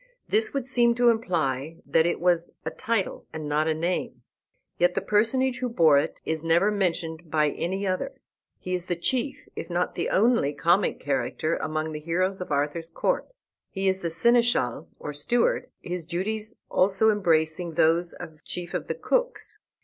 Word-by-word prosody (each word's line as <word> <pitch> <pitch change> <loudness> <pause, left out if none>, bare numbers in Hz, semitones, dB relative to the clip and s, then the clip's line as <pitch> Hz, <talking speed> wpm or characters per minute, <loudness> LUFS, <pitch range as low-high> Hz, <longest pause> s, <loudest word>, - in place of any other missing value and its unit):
This 435 0 +3
would 275 -3 -2
seem 240 -3 +3
to 245 0 +4
imply 165 - -1
that 165 +1 +3
it 175 - -1
was 175 -1 +1
a 160 - -2
title, 220 +3 -2
and 155 -1 -6
not 150 +1 +1
a 160 - +2
name; 170 +3 -2 0.6
yet 175 0 +3
the - - +2
personage 245 +4 +1
who 250 - -1
bore 160 -10 +5
it 155 - -3
is 160 0 -2
never 170 +5 +3
mentioned 170 -4 -2
by 150 -1 +2
any 190 +4 -3
other. 190 +9 -2 0.4
He 185 - -5
is 180 0 -3
the 175 - 0
chief, 250 +9 -2
if - - -6
not 175 +1 -1
the - - -2
only, 215 - +3
comic 175 +6 +2
character 145 +3 -1
among 155 0 -2
the 150 - -5
heroes 185 +4 -1
of 180 - -6
Arthur's 145 +3 -1
court. - - -1 0.4
He 195 -1 -1
is 190 0 +2
the 170 - -1
Seneschal 235 - +2
or 150 - -6
Steward, 240 - +1
his 175 -1 -4
duties 210 +6 -3
also 195 +4 +3
embracing 165 -4 +1
those 170 +1 +3
of 155 -1 -11
chief 175 -1 -5
of - - -3
the - - -2
cooks. - - -1
175 Hz, 175 wpm, -26 LUFS, 160-215 Hz, 0.6 s, bore